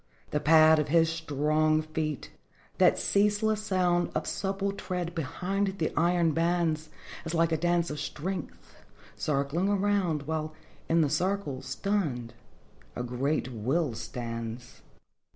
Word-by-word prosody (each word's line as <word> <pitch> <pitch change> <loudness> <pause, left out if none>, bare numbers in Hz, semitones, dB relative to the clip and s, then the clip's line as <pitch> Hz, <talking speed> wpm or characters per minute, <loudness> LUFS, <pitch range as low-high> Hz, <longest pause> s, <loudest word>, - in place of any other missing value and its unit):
The 150 - +1
pad 155 +1 +6
of 150 - 0
his 165 +1 +3
strong 155 0 +1
feet, 155 -1 -4 0.5
that - - +5
ceaseless 210 +1 +2
sound 180 -4 +1
Of - - -1
supple 195 0 -2
tread 180 -3 -4
behind 190 +5 -2
the 160 - -1
iron 170 -1 +3
bands, 165 -1 0 0.3
Is 165 +1 -4
like 165 0 +3
a - - +3
dance 170 +1 +1
of 150 - -5
strength 180 +6 -6 0.4
circling 150 +6 0
around, 195 -6 +1
While 155 +1 -3 0.3
in 165 0 +4
the 150 - +2
circle, 175 -5 -1
stunned, 140 - -2 0.6
a 125 - -3
great 125 +2 -1
will 130 +6 0
stands. 115 +1 -6
160 Hz, 130 wpm, -29 LUFS, 150-180 Hz, 0.6 s, pad